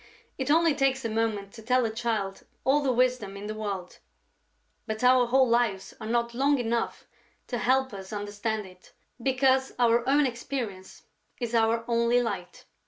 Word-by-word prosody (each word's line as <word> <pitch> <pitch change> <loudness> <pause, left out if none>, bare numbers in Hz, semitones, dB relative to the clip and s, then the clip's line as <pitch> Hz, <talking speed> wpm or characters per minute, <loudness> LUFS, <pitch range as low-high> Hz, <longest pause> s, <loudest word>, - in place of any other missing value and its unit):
It 265 +1 -2
only 325 +1 +4
takes 270 -2 +1
a - - 0
moment 215 -3 -1
to 225 - -11
tell 250 +2 +2
a 220 - -1
child 220 -4 -2 0.2
all 280 +3 +3
the 270 -2 +1
wisdom 250 -5 0
in 200 - -7
the 215 - -4
world, 200 -4 -5 0.9
but 220 +1 -4
our 250 -1 +5
whole 260 +2 +4
lives 230 -5 0
are 215 - -5
not 235 +1 0
long 280 +4 +2
enough 235 -1 -2 0.4
to 240 - -3
help 260 +1 +2
us 190 -1 -8
understand 210 +1 -3
it, 185 -1 -17 0.3
because 265 +1 +2
our 235 -1 +3
own 290 +1 +4
experience 235 -6 -5 0.4
is 240 -2 -3
our 230 0 +2
only 235 +1 +3
light. 240 -2 -4
235 Hz, 170 wpm, -27 LUFS, 215-255 Hz, 0.9 s, our